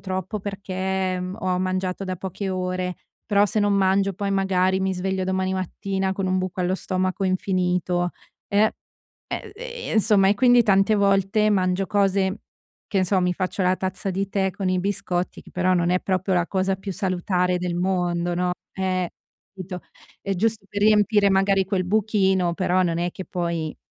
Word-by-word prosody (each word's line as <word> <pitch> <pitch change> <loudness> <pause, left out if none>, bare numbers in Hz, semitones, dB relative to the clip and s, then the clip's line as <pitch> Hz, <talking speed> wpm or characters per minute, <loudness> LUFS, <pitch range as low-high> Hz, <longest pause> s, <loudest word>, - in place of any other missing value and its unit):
troppo, 190 +2 -4
perché 190 -1 -2
m 185 +2 -5
ho 185 -1 0
mangiato 185 +1 -2
da 185 -1 -3
poche 190 +2 -4
ore, 185 -1 -2 0.3
però 205 -1 +4
se 215 - 0
non 205 0 +2
mangio, 195 0 +2
poi 200 +1 -2
magari 190 -1 +2
mi 190 0 0
sveglio 190 +1 -1
domani 190 0 0
mattina 190 +1 -2
con 195 -1 -2
un 185 0 +1
buco 185 0 -3
allo 180 +1 +1
stomaco 185 0 -2
infinito, 180 -1 0 0.4
e 200 - +1
ehm, 215 +1 +4 0.8
ehm, 475 +2 -6
insomma, 205 -3 +4
e 205 - +4
quindi 245 +1 +5
tante 195 +1 +4
volte 200 +1 +3
mangio 185 -1 +1
cose, 195 0 +1 0.5
che 195 - 0
n - - +2
so, 185 +1 +2
mi 180 0 +1
faccio 185 +1 -2
la 185 +1 +3
tazza 190 +1 -3
di 195 +1 -2
tè 195 -1 0
con 190 +1 -3
i 185 0 +1
biscotti, 190 -2 -2
che - - -16
però 185 0 +1
non 175 -1 +1
è 180 0 +2
proprio 190 0 0
la 175 -1 +2
cosa 190 0 0
più 195 +1 -6
salutare 180 -1 0
del 180 -1 -2
mondo, 175 -1 0
no? 180 0 0 0.2
Eh, 185 -2 -1 0.4
capito? 185 -2 -7 0.4
È 195 - -2
giusto 215 +2 0
per 205 - -4
riempire, 210 -1 +4
magari, 195 0 +3
quel 185 -1 0
buchino, 190 -3 +2
però 185 0 +2
non 170 -2 0
è 175 +1 -1
che 190 - -8
poi 170 -3 -3
190 Hz, 180 wpm, -23 LUFS, 185-195 Hz, 0.8 s, quindi